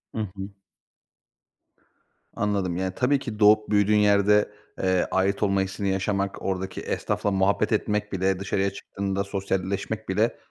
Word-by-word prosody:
Hı 110 - -1
hı. 95 0 -6 1.9
Anladım. 100 -4 -1
Yani, 95 0 -2
tabii 135 +2 +2
ki 115 -5 -6
doğup 105 0 +5
büyüdüğün 105 0 +3
yerde, 105 0 +4 0.3
eee, 95 -1 +2
ait 95 +2 +1
olma 100 -1 +2
hissini 95 +1 -2
yaşamak, 100 +1 -1
oradaki 95 0 -3
esnafla 100 - -1
muhabbet 95 +4 +1
etmek 105 -1 0
bile 95 0 0
dışarıya 95 0 0
çıktığında 100 0 -3
sosyalleşmek 100 +2 -3
bile, 105 +5 +1
100 Hz, 130 wpm, -25 LUFS, 95-105 Hz, 1.9 s, doğup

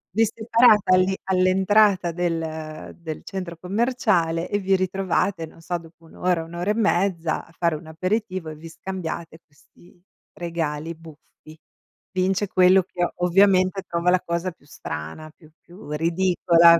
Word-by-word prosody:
Vi 225 +1 +5
separate 220 0 +4
all'i 185 +1 +4
all'entrata 190 0 +3
del 160 -2 -4
del 160 -2 -6
centro 180 -3 -6
commerciale, 180 -4 0
e 205 - +1
vi 195 -1 +2
ritrovate, 185 -2 0
non 165 - -16
so, 175 +1 -2
dopo 165 0 -16
1 - - -17
ora, 180 -2 0
1 165 +1 -11
ora 180 +4 0
e - - +2
mezza 185 -6 0
a - - -21
fare 170 -1 0
un 155 +2 -9
aperitivo, 185 +1 -2
e 155 - -7
vi 160 +2 -11
scambiate 170 -2 -6
questi 175 +4 -23 0.3
regali 165 -2 -3
buffi. 155 -1 -16 0.6
Vince 190 +2 0
quello 185 0 +5
che, 175 0 -2
ovviamente, 185 +1 +3
trova 170 +1 0
la 185 - +4
cosa 170 +1 -2
più 145 - -25
strana, 80 - -7
più 155 -2 -20
più 175 -3 -13
ridicola. 170 +1 +4
175 Hz, 150 wpm, -23 LUFS, 165-190 Hz, 0.6 s, Vi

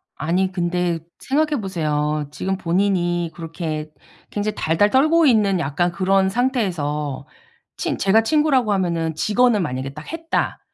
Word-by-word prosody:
아니 180 +5 0
근데 175 -2 -1 0.2
생각해 300 +1 0
보세요. 150 -6 -1
지금 190 +6 -2
본인이 175 -2 0
그렇게 160 -2 -5 0.4
굉장히 210 +1 -2
달달 165 +6 +2
떨고 310 +7 +4
있는 210 -8 +3
약간 175 +4 0
그런 190 +2 +2
상태에서 170 - -1 0.5
친 - - -2
제가 200 +3 +4
친구라고 265 -4 +2
하면은 170 -4 -1
직언을 220 +5 +2
만약에 135 -3 -3
딱 150 +2 -9
했다. 330 0 -2
185 Hz, 300 characters per minute, -21 LUFS, 160-215 Hz, 0.5 s, 떨고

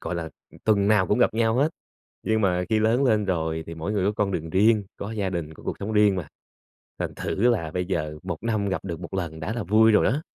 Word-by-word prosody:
gọi 85 - -4
là, 80 -1 -4 0.4
tuần 100 -2 +3
nào 105 -4 +4
cũng 105 - +1
gặp - - +3
nhau 115 -1 +2
hết, 145 +4 +3 0.6
nhưng 110 0 +1
mà 90 -3 +2
khi 110 -1 +2
lớn 115 +5 +2
lên 110 -5 +2
rồi 80 -3 -1
thì 85 - -7
mỗi 80 +5 -4
người 100 -3 0
có 100 - +2
con 100 -2 0
đường 80 -2 -3
riêng, 105 +4 +3
có 100 - -5
gia 105 -4 -2
đình, 85 -4 -4
có - - -15
cuộc - - -3
sống 100 +2 -4
riêng 105 -2 +4
mà, 90 -4 -4 0.7
thành - - -3
thử - - -3
là 85 -10 0
bây 90 +1 -2
giờ 75 -5 -2
1 90 -3 -4
năm 110 -3 0
gặp 95 - -2
được 85 -3 -4
1 85 - -9
lần 85 -4 -3
đã 90 +8 -3
là 115 - -3
vui 110 +4 +5
rồi 105 - +4
á. 140 +6 0
100 Hz, 260 wpm, -25 LUFS, 85-110 Hz, 0.7 s, vui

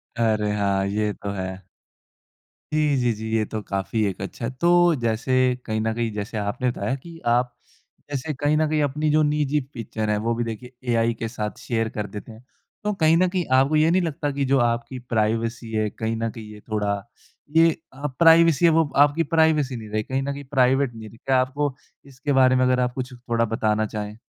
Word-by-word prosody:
अरे! 110 -3 +1
हाँ, 100 -2 +1
ये 105 +1 -1
तो 100 - -7
है। 95 -1 -6 1.1
जी, 150 -2 +2
जी, 125 -2 +2
जी, 110 +1 -6
ये 110 - +2
तो 110 - -3
काफ़ी 100 +3 -1
एक 100 -2 -3
अच्छा 100 +4 -5
है। 115 - -2
तो 170 - +4 0.3
जैसे 115 +2 -1 0.3
कहीं 110 -1 -1
न 110 0 0
कहीं 115 0 -2
जैसे 105 +2 -4
आपने 105 +5 -1
बताया 130 - -2
कि 165 +4 -11
आप 120 +1 +2 0.6
ऐसे 145 +3 -2
कहीं 145 +2 +1
न 155 0 +2
कहीं 155 0 +1
अपनी 150 +2 0
जो 155 +1 +4
निजी 150 0 +1
पिक्चर 110 -2 -4
है 105 - +2
वो 115 - +2
भी 120 - -1
देखे 115 +2 -6 0.2
एआई 115 0 +2
के 115 - -2
साथ 110 -2 -5
शेयर 115 -2 -1
कर 105 -1 -2
देते 105 +2 -9
हैं। 110 +2 -14 0.4
तो 210 0 0
कहीं 160 -3 +3
न 185 +2 +3
कहीं 180 -1 -1
आपको 135 +4 +4
ये 155 +1 +4
नहीं 185 +2 +3
लगता 150 -3 -2
कि 140 0 -1
जो 135 0 +3
आपकी 120 +2 -1
प्राइवेसी 115 +1 -1
है 110 -1 0
कहीं 110 +2 -3
न 115 0 -2
कहीं 110 -1 -9
ये 105 - -11
थोड़ा 105 -2 0 0.6
ये 165 0 +6 0.2
अ, 140 +2 -4
प्राइवेसी 165 -1 +6
अब 165 - +4
वो 160 -2 +3
आपकी 145 +3 +4
प्राइवेसी 155 -5 +3
नहीं 110 -2 -8
रहे, 110 +1 -1
कहीं 130 +4 -2
न 140 +1 -2
कहीं 140 0 -8
प्राइवेट 130 -1 +3
नहीं 110 -1 -9
रही, 115 - -16
क्या 130 +2 +1
आपको 135 +1 -2 0.3
इसके 140 +1 -3
बारे 130 -1 +5
में 130 - +3
अगर 125 0 +2
आप 125 -1 0
कुछ 130 0 -5
थोड़ा 120 -1 -1
बताना 110 -1 0
चाहें? 105 0 -6
120 Hz, 215 wpm, -23 LUFS, 110-145 Hz, 1.1 s, ये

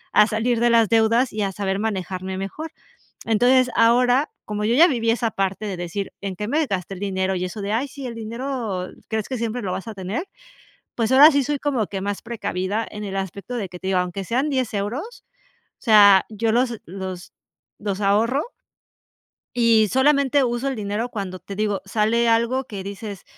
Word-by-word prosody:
a 210 - +7
salir 225 +2 0
de 240 - +3
las 230 -3 +4
deudas 230 +2 +3
y 215 - -2
a 195 - -1
saber 195 0 -2
manejarme 190 -3 -3
mejor. 290 +12 -5 0.5
Entonces, 245 +3 +3
ahora, 245 +5 +4 0.2
como 210 0 -3
yo 230 +3 +2
ya 335 +6 +7
viví 230 -6 0
esa 230 -1 0
parte 195 +1 -2
de 195 - -3
decir: 175 +3 -4
"En 195 -2 -4
qué 210 +3 -4
me 305 +6 +1
gasté 190 -2 -3
el 180 - -10
dinero" 190 -1 -1
y 180 - -2
eso 185 +3 -6
de: 200 +2 -2
"Ay, 260 +5 0
sí, 275 -1 -8
el 240 - -6
dinero 230 -4 -4 0.2
crees 220 -2 -2
que 260 - -2
siempre 230 +1 -2
lo 185 - -2
vas 190 - -5
a 220 - -6
tener, 195 - -4 0.7
pues 230 +1 0
ahora 290 +4 +9
sí 285 0 +3
soy 290 +1 -1
como 265 -8 -1
que 195 - -4
más 200 0 -3
precavida 210 -2 -3
en 210 0 -7
el 195 -1 -4
aspecto 195 +5 -5
de 205 -5 -3
que 180 0 -10
te 190 - -4
digo, 190 -1 +2
aunque 180 +2 -4
sean 260 - 0
10 260 -5 -1
euros, 250 - -4 0.6
o - - -32
sea, 205 -4 +7
yo 220 +1 -1
los 240 -1 +1
los 185 0 -7 0.5
los 205 -1 -3
ahorro. 225 +8 +2 1.1
Y 230 -3 +4
solamente 280 +2 +3
uso 240 +2 -1
el 270 - -3
dinero 210 +3 -2
cuando 195 -5 -5
te 195 +2 -8
digo, 210 -2 -1
sale 220 +3 +1
algo 235 +3 +2
que 200 -6 -7
dices, 200 0 -7
220 Hz, 200 wpm, -22 LUFS, 195-245 Hz, 1.1 s, ahora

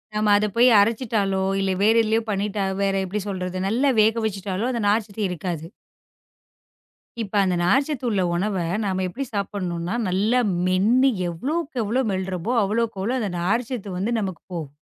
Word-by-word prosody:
நாம 210 0 +2
அதை 210 +1 +1
போய் 245 +2 +7
அரைச்சுட்டாலோ 210 -3 0 0.2
இல்ல 195 0 0
வேற 220 +2 +5
எதுலயோ 220 +1 +1
பண்ணிட்டா 200 0 -1 0.2
வேற 195 0 +1
எப்படி 205 +3 -3
சொல்றது, 185 -1 -4
நல்லா 260 +6 +2
வேக 225 +2 +2
வச்சிட்டாலும் 200 +3 -3
அந்த 235 -2 -2
நார்ச்சத்து 215 0 -1
இருக்காது. 170 -2 -4 1.6
இப்ப 200 - -10
அந்த 185 -2 +1
நார்ச்சத்து 270 - +1
உள்ள 205 -4 +1
உணவை 190 0 -1 0.2
நாம 190 -1 -1
எப்படி 260 +10 -5
சாப்பிடணும்னா, 185 -2 -3
நல்லா 210 +7 +2 0.3
மென்னு 220 +9 +3 0.2
எவ்வளவுக்கு 275 - -3
எவ்வளவு 230 +3 0
மெல்லுறமோ 190 +3 -2
அவ்வளவு 215 +1 -1
அந்த 210 -5 -2
நார்ச்சத்து 205 0 -2
வந்து 205 +6 -1
நமக்குப் 190 -5 -5
போகுது. 155 -5 -5
205 Hz, 145 wpm, -23 LUFS, 185-230 Hz, 1.6 s, போய்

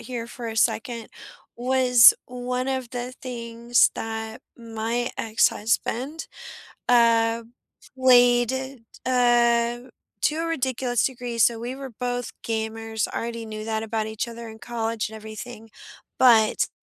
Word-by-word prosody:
here 235 -1 -6
for 235 0 -7
a 220 - -6
second, 230 +1 0 0.5
was 250 -1 +6
one 250 +1 -3
of 260 -3 -3
the 245 0 -5
things 235 -1 +1
that 220 0 -5 0.2
my 230 +1 -3
ex-husband, 230 +6 0 0.6
uh, 230 -1 +4 0.5
played, 245 -1 +5 0.5
uh 240 -1 +3 0.4
to 305 - +2
a 330 +1 -2
ridiculous 260 -6 0
degree, 245 -2 -3
so 230 0 +4
we 240 +3 -5
were 270 -1 -8
both 245 +1 -3 0.2
gamers, 220 -1 -2
already 230 0 -4
knew 215 -1 -7
that 220 0 -2
about 220 -1 -2
each 220 +2 -4
other 235 0 -8
in 220 0 -11
college 230 -2 -3
and 220 - -10
everything. 220 +1 -9 0.5
But 225 -4 +5
235 Hz, 125 wpm, -24 LUFS, 225-245 Hz, 0.6 s, was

